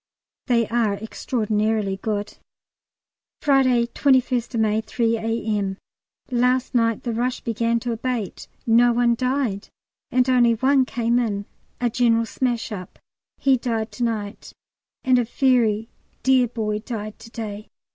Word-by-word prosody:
They 235 -3 +2
are 230 -4 +1
extraordinarily 215 -2 -1
good. 210 0 -3 1.0
Friday, 260 -4 +3
21st 250 -2 +1
May, 215 0 +2
3 230 0 0
A.M. 220 -3 -2 0.5
Last 250 +1 +1
night 230 -3 +1
the 235 - -2
rush 250 +3 -1
began 230 0 0
to 240 - -2
abate; 230 -3 -3 0.2
no 240 +1 +5
one 240 0 +3
died, 250 -4 -1 0.4
and 250 +1 +2
only 245 -2 +4
one 265 +3 +3
came 235 0 0
in 205 -4 -2 0.3
a 240 -1 0
general 230 -1 +2
smash 240 -1 -2
up; 185 -4 -7 0.4
he 270 -1 +3
died 225 -3 -2
to 210 +4 -4
night, 215 -3 -3 0.5
and 255 -1 +4
a - - +2
very 230 -3 +2 0.4
dear 260 -2 +4
boy 215 -2 -2
died 215 -2 -6
to - - -12
day. 215 -2 -7
230 Hz, 135 wpm, -23 LUFS, 220-250 Hz, 1.0 s, no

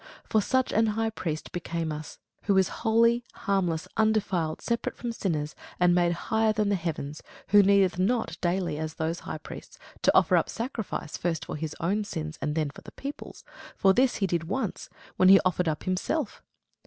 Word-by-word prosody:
For 220 - +2
such 260 +5 +1
an 225 +1 +3
high 225 0 +1
priest 160 -7 -4
became 170 -2 -3
us, 150 0 -7 0.3
who 200 -2 +3
is 190 -2 +4
holy, 230 +1 +3
harmless, 180 -5 -1
undefiled, 200 -7 +1
separate 235 0 -2
from 240 - -3
sinners, 155 -9 -2 0.3
and 180 0 +5
made 175 -1 +3
higher 220 +5 +1
than 210 -1 +1
the 200 - +2
heavens; 155 -4 -4 0.3
who 205 +1 +8
needeth 195 -2 +3
not 200 -3 +1
daily, 175 -3 0
as 155 0 -4
those 160 +2 -2
high - - -6
priests, - - -10 0.2
to - - +4
offer - - +5
up - - +1
sacrifice, 230 - -4
first 165 -3 -2
for - - -5
his 155 0 -4
own 200 +6 0
sins, 160 -5 -5
and 150 - -1
then 155 -3 0
for - - -13
the - - -12
people's: 280 +1 -8 0.3
for 195 -1 +5
this 255 +4 +3
he 200 - 0
did 170 -3 -1
once, 205 +10 -3 0.3
when 185 - +6
he 195 0 +9
offered 180 -1 +1
up 155 -1 -1
himself. 200 - -2
185 Hz, 190 wpm, -27 LUFS, 165-220 Hz, 0.3 s, he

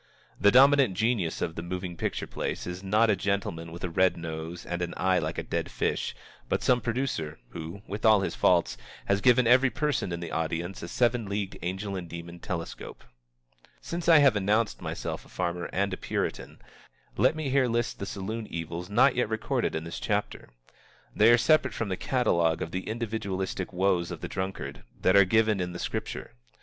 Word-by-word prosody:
The 100 - +6
dominant 135 -3 +6
genius 110 -6 0
of 80 - -2
the 85 - -5
moving 90 0 -5
picture - - -2
place - - -4
is 90 +1 -5
not 105 +3 +3
a - - +3
gentleman 95 -4 -2
with 85 - -9
a 90 - -1
red 95 +1 +3
nose 80 +1 -6
and 85 0 -3
an 85 0 -3
eye 95 0 +2
like 80 0 -3
a - - -2
dead - - -3
fish, - - -2 0.3
but - - 0
some 125 -1 +3
producer 115 - -2
who, 85 +5 -8
with 105 +2 -6
all 110 -3 +6
his 95 - -2
faults, - - +2 0.3
has 100 0 +1
given 125 +1 +5
every 125 +3 +5
person 140 -6 -1
in 85 - -3
the 85 -1 -6
audience 85 +3 -2
a 85 - -5
seven 120 +2 +1
leagued 100 -1 -2
angel 95 +3 -3
and 90 -3 -6
demon 85 +1 -8
telescope. 85 -2 -6 0.8
Since 170 0 -3
I 165 - +9
have 140 -6 +6
announced 105 +3 +1
myself - - -4
a - - -19
farmer 90 -1 -3
and 100 +1 0
a - - -3
puritan, - - -3 0.6
let - - +3
me 155 -4 -3
here 135 -1 +3
list 120 0 -1
the 100 - -4
saloon 110 +3 -4
evils 85 +2 -5
not 125 +6 +4
yet 125 -3 +1
recorded 110 0 -1
in 80 - -2
this 85 - -6
chapter. - - -2 0.7
They 110 +2 +6
are 120 - +7
separate 155 +5 +3
from 115 - -2
the 95 - 0
catalogue 85 -9 +1
of 80 - -6
the 95 +1 -4
individualistic 105 -5 -3
woes 90 -2 +1
of - - -7
the - - -4
drunkard 95 0 -5 0.2
that 95 - +3
are 100 -1 +8
given 110 +1 +3
in 90 -1 -2
the - - -5
Scripture. - - -4
95 Hz, 195 wpm, -28 LUFS, 85-115 Hz, 0.8 s, I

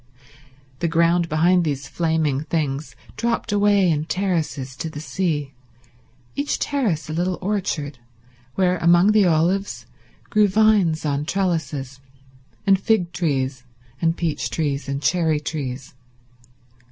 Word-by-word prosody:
The 170 - 0
ground 170 +1 +2
behind 175 +4 +3
these 140 -3 -2
flaming 160 -4 0
things 150 -3 -2 0.2
dropped 235 -1 -1
away 205 -2 +3
in 155 -2 +1
terraces 160 -8 -2
to 165 - -4
the 150 - -7
sea, 155 -4 -2 0.8
each 285 +1 -1
terrace 215 - -1
a 155 - -5
little 180 +2 -1
orchard, 175 -9 -2 0.6
where 180 -2 +2
among 175 +4 +5
the 210 -3 +4
olives 165 - +1 0.5
grew 210 -1 +4
vines 195 -6 +3
on 145 0 -1
trellises, 155 -8 -2 0.7
and 195 -1 +4
fig 195 -6 +1
trees, 135 -7 -1 0.4
and 165 0 +1
peach 150 -8 -2
trees, 145 -2 -2
and 140 +1 -3
cherry 160 -1 +2
trees. 135 -4 -5
165 Hz, 125 wpm, -22 LUFS, 145-185 Hz, 0.8 s, among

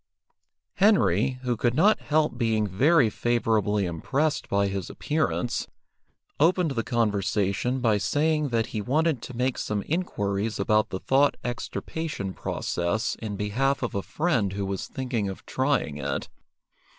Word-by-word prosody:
Henry, 195 -9 +3
who 125 -1 0
could 120 +2 0
not 205 +8 +4
help 155 -2 +1
being 110 -3 +1
very 130 - +4
favourably 110 -3 +1
impressed 135 - -1
by 100 0 +2
his 95 -2 -3
appearance, 150 -5 -1 0.7
opened 170 +1 +3
the 120 -4 -1
conversation 105 +1 0
by 110 -4 +3
saying 150 +4 +1
that 115 -2 +1
he 110 - -1
wanted 150 +4 +1
to 125 - -8
make 125 0 0
some 105 -1 -2
inquiries 105 - -1
about 110 +1 +2
the 95 - -4
Thought 140 +6 +3
extirpation 120 -2 -4
process 95 +8 -2
in 110 -2 -4
behalf 125 +8 0
of 120 - -2
a 100 - -1
friend 120 - 0
who 100 0 -2
was 95 -1 -3
thinking 120 -6 -2
of 95 - -8
trying 130 - 0
it. 70 -1 -3
115 Hz, 140 wpm, -26 LUFS, 100-145 Hz, 0.7 s, not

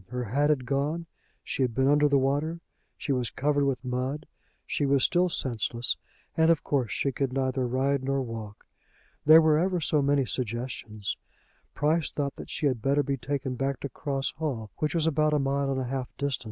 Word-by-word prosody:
Her 125 +1 -3
hat 140 +7 +1
had 135 -4 +1
gone; 145 +5 -1 0.4
she - - -3
had 125 -3 +1
been 130 0 +3
under 145 +1 +4
the 140 - +4
water; 145 +5 0 0.4
she 145 - -3
was 125 -3 0
covered 145 0 +1
with 135 -1 -1
mud; 130 +4 -2 0.4
she - - -1
was 140 -2 +3
still 180 +1 +3
senseless, 120 -4 0 0.4
and 160 0 +4
of 165 -3 +3
course 130 -6 0
she 140 - 0
could 135 0 -1
neither 130 -1 0
ride 135 +2 +1
nor 135 0 0
walk. 110 -3 -7 0.6
There 160 +2 +9
were 155 -1 +4
ever 180 +1 +1
so 155 -2 +2
many 140 -1 +2
suggestions. 115 -4 -3 0.6
Price 155 +1 +1
thought 140 -2 -3
that - - -9
she - - -2
had 130 -5 +1
better 140 +3 +2
be 140 0 -1
taken 135 0 -3
back 135 +1 -2
to 140 - -4
Cross 135 0 -2
Hall, 125 -10 -3
which 150 +2 -1
was 165 -2 +2
about 155 -1 +2
a - - +4
mile 140 0 0
and 135 -1 0
a - - -1
half 130 0 -3
distant. 140 -2 -1
135 Hz, 200 wpm, -28 LUFS, 130-150 Hz, 0.6 s, There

